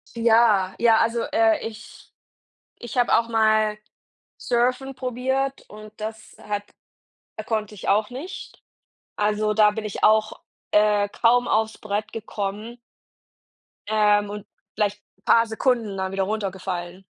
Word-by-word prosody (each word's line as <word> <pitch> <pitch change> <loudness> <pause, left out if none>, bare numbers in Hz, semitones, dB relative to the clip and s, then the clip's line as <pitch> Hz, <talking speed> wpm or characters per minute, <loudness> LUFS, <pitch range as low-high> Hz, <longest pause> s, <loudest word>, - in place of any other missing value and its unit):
Ja, 225 -5 +3
ja, 230 -2 +5
also, 230 +1 +1
äh, 330 0 +3
ich 220 -1 -13 0.7
ich 240 +1 -8
habe 245 - +4
auch 230 0 -1
mal 215 -1 +2 0.6
Surfen 255 +2 0
probiert 265 +2 -2
und 215 0 -12
das 220 +1 -7
hat 205 -1 -4 0.8
konnte 215 -2 -2
ich 195 - -8
auch 210 +1 +2
nicht. 285 +10 -9 0.5
Also, 210 0 0
da 210 0 +5
bin 215 0 -5
ich 210 - -6
auch, 215 0 +3 0.3
äh, 210 -1 +3
kaum 245 +3 +2
aufs 220 0 0
Brett 210 0 -4
gekommen. 215 +1 -5 1.1
Ähm, 210 -1 +3
und 210 0 -7 0.3
vielleicht 210 0 -1 0.2
'n - - -37
paar 230 0 +4
Sekunden 225 -3 0
dann 190 0 -2
wieder 195 0 -1
runtergefallen. 190 -3 -4
215 Hz, 130 wpm, -23 LUFS, 210-235 Hz, 1.1 s, ja